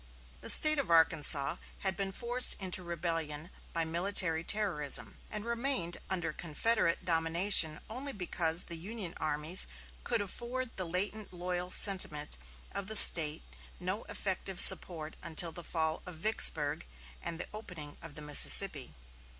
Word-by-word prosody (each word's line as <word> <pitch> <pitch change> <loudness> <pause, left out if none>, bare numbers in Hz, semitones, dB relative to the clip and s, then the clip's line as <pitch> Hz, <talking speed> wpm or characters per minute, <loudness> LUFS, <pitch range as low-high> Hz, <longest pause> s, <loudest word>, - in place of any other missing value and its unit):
The - - -4
State 305 -1 +5
of 275 - -6
Arkansas 150 -4 +1 0.2
had 190 -1 -1
been 195 +1 -7
forced 245 +4 +2
into 185 -1 -2
rebellion 165 -2 -7 0.2
by 165 -1 -4
military 170 -1 -2
terrorism, 175 -9 0
and 210 0 -8
remained 235 -7 -4
under 175 -4 -5
Confederate 175 +3 -3
domination 165 -1 +2
only 260 +5 -7
because 175 -5 -2
the 170 -1 -7
Union 195 -1 -8
armies 155 +3 +2 0.4
could - - -2
afford 240 +5 -5
the 185 - -7
latent 200 +5 -5
loyal 180 0 -7
sentiment 155 - +1 0.3
of 200 -1 -9
the 220 - -5
State 160 -6 +9 0.4
no 185 +4 -6
effective 190 -1 -6
support 160 -3 +4
until 165 +1 -4
the 175 +2 -12
fall 160 -1 -6
of 180 - -11
Vicksburg 160 -5 +1 0.4
and 165 - -9
the - - -8
opening 175 -9 -10
of 165 -3 -14
the 150 - -11
Mississippi. 150 -1 +3
175 Hz, 140 wpm, -28 LUFS, 160-200 Hz, 0.4 s, State